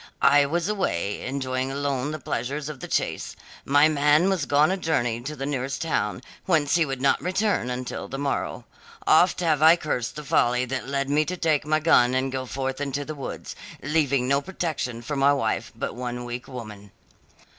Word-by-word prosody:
I 140 0 +6
was 170 +4 -1
away, 105 - -1
enjoying 130 0 -2
alone 140 -1 -1
the 155 - -4
pleasures 140 +2 -3
of 150 -3 -7
the - - -7
chase; - - -2 0.3
my 145 +2 +5
man 150 +4 +3
was 175 -7 -1
gone 145 +4 +4
a - - +1
journey 120 -10 0
to 150 +5 -5
the 135 -1 -4
nearest 135 0 -2
town, 130 -7 -1 0.2
whence 155 -6 +2
he 170 -3 +3
would 135 -1 -4
not 140 - +3
return 185 - 0
until 125 0 -4
the 135 - -5
morrow. 140 0 -2 0.4
Oft 175 +3 +4
have 155 -4 +2
I 160 +2 +8
cursed 150 -8 -3
the 150 - -6
folly 125 -2 +2
that 130 0 -4
led 140 0 -1
me 145 +2 +3
to 180 +3 -4
take 155 -4 +1
my 155 0 +2
gun 130 -6 +4
and 130 +1 0
go 130 -1 -4
forth 135 +1 -3
into 140 0 -2
the 155 - -5
woods, 140 -3 -7 0.3
leaving 140 -3 +1
no 140 +1 +2
protector 145 -9 -4
for 145 +4 -4
my 140 +1 +4
wife 140 - -1
but - - -4
one 125 0 -5
weak 120 +1 -6
woman. 110 -6 -9
140 Hz, 195 wpm, -25 LUFS, 130-155 Hz, 0.4 s, I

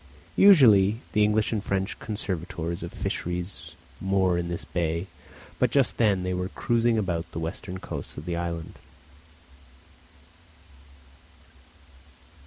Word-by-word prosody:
Usually 115 - +7
the 105 - +3
English 105 0 +2
and 105 -3 -1
French 95 0 -2
conservators 85 -5 -4
of - - -6
fisheries 90 -2 -4 0.3
moor 95 -2 +2
in 85 0 -1
this 85 - -4
bay, 85 0 -1 0.5
but - - +3
just 140 -3 +2
then 100 -5 +2
they 90 0 -1
were 90 +1 -2
cruising 115 +1 +1
about 90 -5 -2
the - - -3
western 85 +3 -5
coasts - - -7
of 75 - -7
the 85 - -2
island. 85 -1 -4
95 Hz, 120 wpm, -26 LUFS, 85-105 Hz, 0.5 s, Usually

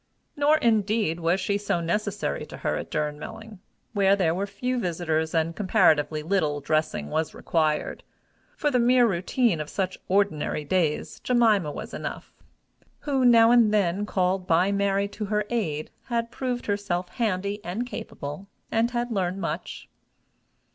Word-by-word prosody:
Nor, 295 +2 +4
indeed, 215 - +1
was 170 +3 +1
she 200 +2 0
so 200 -4 -1
necessary 205 +4 -2
to - - -9
her - - -1
at - - -5
Durnmelling, 190 +8 -5 0.3
where 200 -2 +4
there 175 -5 +1
were 195 +3 -2
few 250 +4 -2
visitors, 160 -4 -1
and 165 +1 +1
comparatively 155 -6 +2
little 155 -4 0
dressing 155 - -1
was 160 0 -1
required: 155 -2 0 0.6
for 295 -2 +1
the 250 - +2
mere 245 +1 +5
routine 190 -1 +1
of 150 - -6
such 190 -2 -3
ordinary 185 -6 0
days, 160 -2 0
Jemima 220 -10 +2
was - - -7
enough, - - -6 0.7
who, 275 -3 0
now 230 -2 +7
and 235 -3 +5
then 205 -1 +1
called 185 -1 0
by 175 +4 +3
Mary 200 0 +1
to 210 +1 -5
her 210 0 0
aid, 155 -11 -2
had 235 -2 -2
proved 250 -1 -3
herself 200 -3 -1
handy 205 -2 -2
and 195 +8 -3
capable, 195 - -7 0.2
and 225 +1 +2
had 240 0 -2
learned 185 -3 -1
much. - - -5
200 Hz, 150 wpm, -26 LUFS, 165-225 Hz, 0.7 s, now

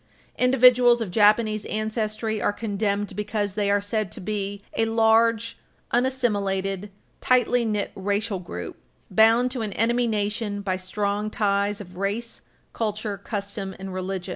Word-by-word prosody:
Individuals 250 -1 +5
of 220 -6 -3
Japanese 215 +1 +3
ancestry 215 0 -2
are - - +2
condemned 205 -1 -2
because 210 -1 -2
they 205 0 0
are 205 0 +3
said 205 -1 -2
to - - -7
be 200 0 -3 0.2
"a 225 - +2
large, 225 0 +2 0.3
unassimilated, 205 -6 0 0.3
tightly 245 -1 +3
knit 210 -3 -1
racial 200 +1 -1
group, 90 - -7 0.3
bound 225 +5 +4
to 250 -2 -3
an 210 -3 -3
enemy 240 +2 +1
nation 210 -1 -2
by 190 -2 0
strong 200 +3 -2
ties 205 -1 0
of 180 -3 -11
race, 210 +5 -3 0.3
culture, 215 -1 -2
custom 200 -1 -5
and 195 0 -7
religion." 185 -1 -4
210 Hz, 140 wpm, -24 LUFS, 200-225 Hz, 0.3 s, Individuals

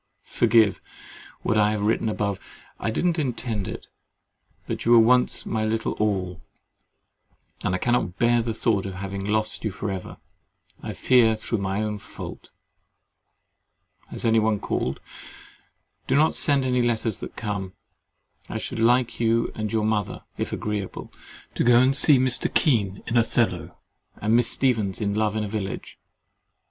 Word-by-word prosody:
—Forgive 110 -4 +3 0.6
what 110 - +2
I 105 0 +4
have 105 -1 -2
written 110 +1 +1
above; 100 -2 -2 0.4
I 105 - -2
did 110 - -1
not 170 -2 +1
intend 115 -7 -2
it: - - -7 0.8
but - - -4
you 120 - +4
were - - +8
once 125 +2 +3
my 110 -1 -1
little 110 +1 -1
all, 95 -5 -1 1.2
and 90 - 0
I - - +1
cannot 120 -4 0
bear 120 0 +3
the 115 -1 -3
thought 100 -4 0
of 95 - -6
having 95 +1 -5
lost 110 +2 -1
you 110 - 0
for 100 +1 -4
ever, 95 -1 -6 0.6
I - - -5
fear 120 -4 +4
through 110 +1 -3
my 100 +2 -1
own 105 -1 -3
fault. - - -9 1.6
Has - - -4
any 115 0 +4
one 110 -1 +1
called? 65 -6 -2 1.1
Do - - +2
not 155 +3 +4
send 140 -4 +1
any 125 -1 +1
letters 115 -3 0
that - - -8
come. 100 -4 -4 0.8
I - - -3
should - - -5
like 120 +1 +2
you 115 0 +1
and 110 -1 -4
your 110 -1 0
mother 105 -2 -1
(if - - -3
agreeable) 105 -2 -4 0.4
to - - 0
go 120 0 +6
and 130 +2 +3
see 145 0 +6
Mr. 130 -1 +1
Kean 100 -9 +1
in 120 - 0
Othello, 95 -7 0 0.4
and 110 +2 +1
Miss 120 -1 +4
Stephens 110 -8 +1
in 100 -2 -1
Love 105 0 0
in 110 - -1
a - - -3
Village. 100 -2 -5
110 Hz, 160 wpm, -24 LUFS, 100-120 Hz, 1.6 s, were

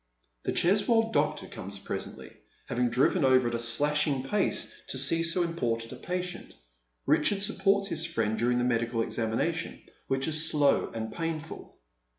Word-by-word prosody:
The - - +1
Cheswold 220 +5 +2
doctor 150 +1 +1
comes 100 +2 -7
presently, 100 - -6 0.3
having 125 0 0
driven 135 +8 +2
over 130 -2 +4
at - - -6
a 115 - -1
slashing 140 +3 +1
pace 195 +9 0
to - - -3
so 165 +6 +2
important 115 -9 -2
a - - -6
patient. 180 0 -5 0.5
Richard 200 -1 +2
supports 200 -1 +1
his 165 -2 -1
friend 115 -10 -1
during 120 +2 +1
the 120 - +1
medical 115 -1 0
examination, 115 -1 -2 0.3
which 135 0 0
is 155 0 +2
slow 145 -2 +2
and 110 -1 -5
painful. 165 -1 -5
145 Hz, 150 wpm, -29 LUFS, 120-170 Hz, 0.5 s, over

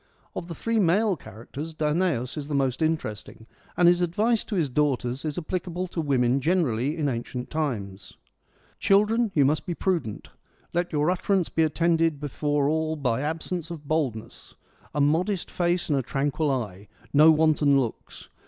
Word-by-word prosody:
Of 170 - -5
the 170 - -6
three 230 +5 0
male 200 +2 +3
characters 145 - -9
Danaus 150 -5 0
is 145 -2 -5
the 150 - -2
most 135 0 0
interesting, 110 -8 -3 0.3
and 175 - +5
his 175 0 +5
advice 210 +7 +1
to 215 - -4
his 165 -5 +1
daughters 130 -2 0
is 150 -2 -3
applicable 180 +1 -3
to 170 - -2
women 130 -3 +2
generally 150 -4 +1
in 150 -3 0
ancient 125 0 -4
times: 110 -11 -4 0.6
Children, 210 +3 +3
you 145 -3 +5
must 150 +6 0
be 175 - -2
prudent: 165 - -2 0.4
let 175 +1 0
your 150 +3 +2
utterance 185 0 0
be 165 - 0
attended 165 -1 +2
before 145 0 0
all 160 +1 0
by 130 -5 -1
absence 160 +2 -3
of 155 -4 -8
boldness: 140 -9 -3 0.4
a - - 0
modest 175 +6 +1
face 175 0 0
and 145 -3 +2
a - - 0
tranquil 140 +4 -1
eye: 105 -7 -3 0.3
no 150 +2 +7
wanton 155 -3 +4
looks. 120 -4 -5
155 Hz, 160 wpm, -26 LUFS, 135-175 Hz, 0.6 s, no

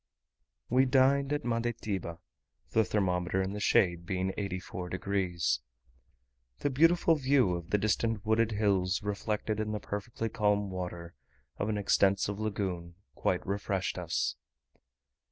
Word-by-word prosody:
We 130 +2 +4
dined 135 +2 +3
at 145 -2 -1
Mandetiba; 115 -7 -2 0.5
the 110 - +4
thermometer 90 -2 0
in 95 +1 -1
the 105 - -4
shade 85 -4 +3
being 95 +1 -2
84 90 -2 -4
degs. 90 -6 0 1.0
The 145 - -1
beautiful 165 +4 +4
view 135 - +3
of 85 -1 -5
the 105 - +3
distant 110 +1 0
wooded 110 +1 +2
hills, 100 -3 +1
reflected 105 +1 -2
in 110 0 -2
the 105 - -2
perfectly 115 +3 -4
calm 105 -3 +1
water 90 -2 -5 0.4
of 105 - -1
an 105 - 0
extensive 100 0 +2
lagoon, 95 -5 -3 0.2
quite - - -1
refreshed 100 -1 -2
us. - - -1
100 Hz, 130 wpm, -30 LUFS, 95-115 Hz, 1.0 s, We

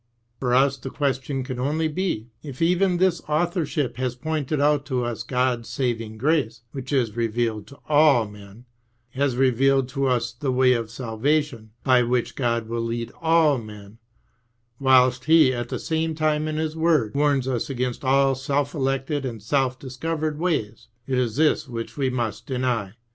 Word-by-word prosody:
For 125 -2 +1
us 135 +1 +3
the 135 - -7
question 135 -1 -2
can 125 -1 -5
only 155 +5 0
be, 150 - -3
if 140 -4 -9
even 180 +2 +2
this 185 -1 +2
authorship 150 -5 -1
has 125 -1 -2
pointed 155 +1 -2
out 145 0 +3
to 130 -3 -1
us 120 -2 -4
God's 125 -2 -1
saving 115 -4 -2
grace, 125 -4 0
which 135 0 -7
is 120 -6 +1
revealed 115 -2 -1
to 140 - -14
all 145 -7 +4
men, 105 +3 -14 0.5
has 135 -1 0
revealed 135 +1 +3
to 135 0 -1
us 120 -2 0
the 130 +3 -2
way 130 0 +4
of 115 -2 -2
salvation, 120 +1 -1
by 130 -2 +4
which 120 0 0
God 115 -3 -1
will 115 +1 -2
lead 115 0 -3
all 160 -4 +4
men, 105 -1 -11 0.8
whilst 130 -1 +4
Pie 160 -4 +6
at 120 -1 -4
the - - -2
same 160 0 -2
time 155 -1 0
in 155 0 -3
His 155 0 -2
word 160 -9 +2
warns 140 -2 +1
us 125 -1 -2
against 125 -1 -3
all 135 +1 +3
self 140 +2 -1
elected 135 +1 -1
and 120 -4 -4
self 130 +4 0
discovered 150 +4 -3
ways. 155 -12 -2 0.2
It 130 -2 0
is 120 -4 -1
this 150 0 +2
which 115 -1 -6
we 135 -3 0
must 120 -4 -3
deny. 125 -7 -1
130 Hz, 170 wpm, -24 LUFS, 120-150 Hz, 0.8 s, Pie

